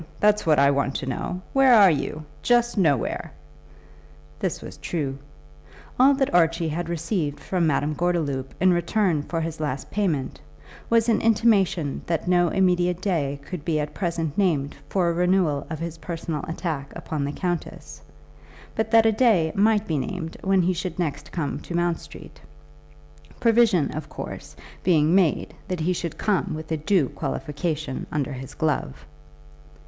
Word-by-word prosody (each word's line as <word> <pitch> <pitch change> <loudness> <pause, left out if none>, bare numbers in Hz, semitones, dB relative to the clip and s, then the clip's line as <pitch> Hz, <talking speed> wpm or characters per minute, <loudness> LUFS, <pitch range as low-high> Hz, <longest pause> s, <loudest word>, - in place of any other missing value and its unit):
That's 210 -3 +3
what 155 -2 +5
I 140 0 +5
want 140 0 0
to - - -3
know. 180 +8 -4
Where 270 -2 +6
are 200 -4 +7
you? 155 +1 -3 0.2
Just 240 0 +2
nowhere." 150 - +1 1.1
This - - -2
was - - -10
true. 140 -5 -3 0.8
All 275 +2 +6
that 270 -6 0
Archie 165 -1 +3
had 170 +2 -3
received 165 -3 -2
from 180 -3 0
Madame 150 0 +1
Gordeloup 150 -6 -1
in 185 -1 +4
return 175 -1 +1
for 165 +3 -3
his 160 0 -4
last 145 -3 -3
payment, 165 -11 -1 0.5
was 230 0 +3
an 225 -2 +2
intimation 200 -9 +2
that 165 0 -1
no 175 -1 +4
immediate 180 -1 +2
day 150 -8 -1
could 180 -3 -6
be 155 -2 0
at 150 0 -3
present 165 -4 -2
named 155 -8 +1
for 185 -3 +1
a 170 - +1
renewal 175 -5 +1
of 160 - -4
his 165 0 -6
personal 165 -3 -4
attack 160 -4 -4
upon 155 -3 -4
the 140 - -2
countess; 175 +2 -4 0.7
but 220 0 -1
that 225 0 +5
a 225 - +5
day 210 -8 +3
might 210 +1 +3
be 155 -6 -1
named 160 +4 -4
when 190 -1 +3
he 185 +2 +2
should 180 0 -4
next 150 -4 -3
come 155 -5 -3
to 175 - -7
Mount 175 -1 +1
Street, - - -13 1.0
provision, 225 -8 +3
of 155 -1 -6
course, - - -8 0.3
being 160 -3 +3
made 185 -5 +2
that 180 -3 -3
he 180 +3 +1
should 170 -2 -4
come 200 -6 0
with 155 +1 -8
a 160 - +1
due 160 -1 +2
qualification 150 0 -3
under 145 -1 -2
his 135 +2 -8
glove. 155 - -2
170 Hz, 165 wpm, -24 LUFS, 150-190 Hz, 1.1 s, are